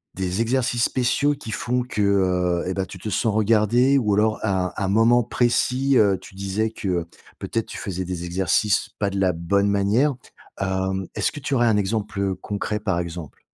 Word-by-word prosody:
des 95 Hz, +3 st, -1 dB
exercices 120 Hz, 0 st, 0 dB
spéciaux 135 Hz, +3 st, +1 dB
qui 110 Hz, -, -8 dB
font 125 Hz, +2 st, -1 dB
que, 105 Hz, -4 st, -3 dB
heu, 90 Hz, -3 st, +1 dB
et, 95 Hz, -, -1 dB
bah, 95 Hz, 0 st, -2 dB
tu 95 Hz, +1 st, -10 dB
te 110 Hz, -, -7 dB
sens 110 Hz, 0 st, 0 dB
regardée? 115 Hz, +5 st, +3 dB
Ou 105 Hz, -6 st, +1 dB
alors 110 Hz, +1 st, +2 dB
à 95 Hz, -3 st, +1 dB
un 100 Hz, -, 0 dB
un -, -, -1 dB
moment 115 Hz, +3 st, +4 dB
précis, 125 Hz, +3 st, +1 dB
heu, 100 Hz, -3 st, +4 dB
tu 95 Hz, -, -14 dB
disais 100 Hz, +3 st, -1 dB
que 90 Hz, -6 st, -2 dB, 0.3 s
peut-être, 115 Hz, -1 st, -3 dB
tu -, -, -8 dB
faisais 95 Hz, -2 st, -4 dB
des 90 Hz, -1 st, -4 dB
exercices, 95 Hz, +3 st, +1 dB
pas 100 Hz, -1 st, +1 dB
de 100 Hz, 0 st, -3 dB
la 95 Hz, -1 st, +3 dB
bonne 100 Hz, +4 st, 0 dB
manière, 105 Hz, +9 st, +2 dB, 0.5 s
hem, 95 Hz, 0 st, -1 dB
est-ce -, -, 0 dB
que 145 Hz, -, -8 dB
tu 140 Hz, -, -3 dB
aurais 120 Hz, -1 st, +3 dB
un 105 Hz, -2 st, +3 dB
exemple 100 Hz, -2 st, -1 dB
concret 105 Hz, +1 st, -3 dB
par 95 Hz, -5 st, -1 dB
exemple? 85 Hz, -3 st, -7 dB
100 Hz, 195 wpm, -23 LUFS, 95-115 Hz, 0.5 s, moment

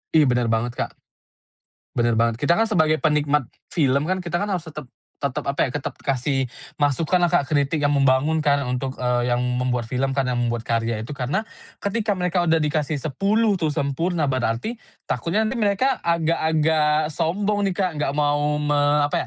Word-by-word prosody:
Ih, 155 Hz, -, +7 dB
bener 125 Hz, -3 st, +2 dB
banget 115 Hz, +2 st, 0 dB
Kak. -, -, -2 dB, 1.1 s
Bener 120 Hz, -1 st, +2 dB
banget. 115 Hz, 0 st, +1 dB
Kita 145 Hz, +7 st, +2 dB
kan 225 Hz, +4 st, +1 dB
sebagai 155 Hz, -5 st, +2 dB
penikmat 150 Hz, -4 st, +1 dB, 0.2 s
film 140 Hz, -3 st, +2 dB
kan, 185 Hz, +1 st, -1 dB
kita 175 Hz, -1 st, -2 dB
kan 205 Hz, +2 st, -2 dB
harus 175 Hz, -3 st, -3 dB
tetep 150 Hz, -3 st, -8 dB, 0.3 s
tetep 140 Hz, -3 st, -2 dB
apa 140 Hz, -, +1 dB
ya, -, -, -6 dB
tetep 145 Hz, -, -3 dB
kasih 135 Hz, 0 st, -1 dB, 0.3 s
masukan 155 Hz, +5 st, +2 dB
lah 175 Hz, -, +3 dB
Kak, 170 Hz, -4 st, +2 dB
kritik 145 Hz, +1 st, +1 dB
yang 145 Hz, -, +3 dB
membangun 140 Hz, +3 st, +3 dB
kan 145 Hz, -2 st, +2 dB
untuk 130 Hz, +1 st, -3 dB
eee, 125 Hz, -1 st, 0 dB
yang 120 Hz, -, 0 dB, 0.2 s
membuat 125 Hz, -1 st, 0 dB
film 135 Hz, +2 st, -1 dB
kan, 135 Hz, -, +2 dB
yang 120 Hz, -, 0 dB
membuat 120 Hz, -1 st, -1 dB
karya 115 Hz, -1 st, -1 dB
itu. 120 Hz, -, -8 dB
Karena 140 Hz, -, -2 dB, 0.4 s
ketika 205 Hz, 0 st, 0 dB
mereka 180 Hz, -1 st, 0 dB
udah 165 Hz, -, +4 dB
dikasih 150 Hz, 0 st, 0 dB
10 200 Hz, -, +1 dB
tuh, 160 Hz, -, +1 dB
sempurna 150 Hz, +2 st, -1 dB
berarti 130 Hz, -, -2 dB, 0.3 s
takutnya 200 Hz, +6 st, 0 dB
nanti 235 Hz, +3 st, -2 dB
mereka 215 Hz, +6 st, +1 dB
agak-agak 160 Hz, -2 st, +1 dB
sombong 200 Hz, +6 st, 0 dB
nih 190 Hz, -, -1 dB
Kak, 185 Hz, -1 st, +1 dB
enggak 140 Hz, -1 st, 0 dB
mau 145 Hz, 0 st, +1 dB
me 145 Hz, 0 st, +1 dB, 0.3 s
apa -, -, -2 dB
150 Hz, 180 wpm, -23 LUFS, 130-175 Hz, 1.1 s, Ih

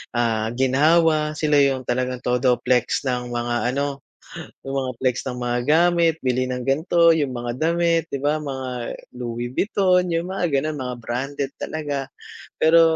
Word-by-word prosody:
ah, 115 Hz, -2 st, +1 dB
ginhawa, 150 Hz, +4 st, +3 dB
sila 150 Hz, -2 st, +2 dB
yung 135 Hz, -2 st, +2 dB
talagang 125 Hz, +1 st, -2 dB
todo 125 Hz, 0 st, +2 dB
flex 125 Hz, +1 st, +1 dB
ng 125 Hz, -2 st, -2 dB
mga 120 Hz, +1 st, -1 dB
ano, 140 Hz, 0 st, -2 dB, 0.7 s
yung 135 Hz, 0 st, -4 dB
mga 130 Hz, -1 st, -3 dB
flex 130 Hz, 0 st, 0 dB
ng 125 Hz, -, -4 dB
mga 120 Hz, 0 st, 0 dB
gamit, 170 Hz, +1 st, +4 dB
bili 130 Hz, 0 st, +1 dB
ng 125 Hz, -1 st, -3 dB
gan'to, 165 Hz, +5 st, +4 dB
yung 140 Hz, -6 st, -1 dB
mga 120 Hz, 0 st, -3 dB
damit, 165 Hz, 0 st, +1 dB
'di -, -, -3 dB
ba? 150 Hz, +1 st, +1 dB
Mga 135 Hz, -3 st, -5 dB, 0.5 s
Louis 120 Hz, 0 st, -4 dB
Vuitton, 185 Hz, +1 st, +2 dB
yung 170 Hz, +2 st, -2 dB
mga 180 Hz, -3 st, 0 dB
ganon, 155 Hz, -1 st, -4 dB
mga 125 Hz, -1 st, -4 dB
branded 135 Hz, +4 st, -4 dB
talaga. 145 Hz, -3 st, -3 dB, 0.5 s
Pero, 165 Hz, +1 st, +6 dB
135 Hz, 160 wpm, -22 LUFS, 125-160 Hz, 0.7 s, Pero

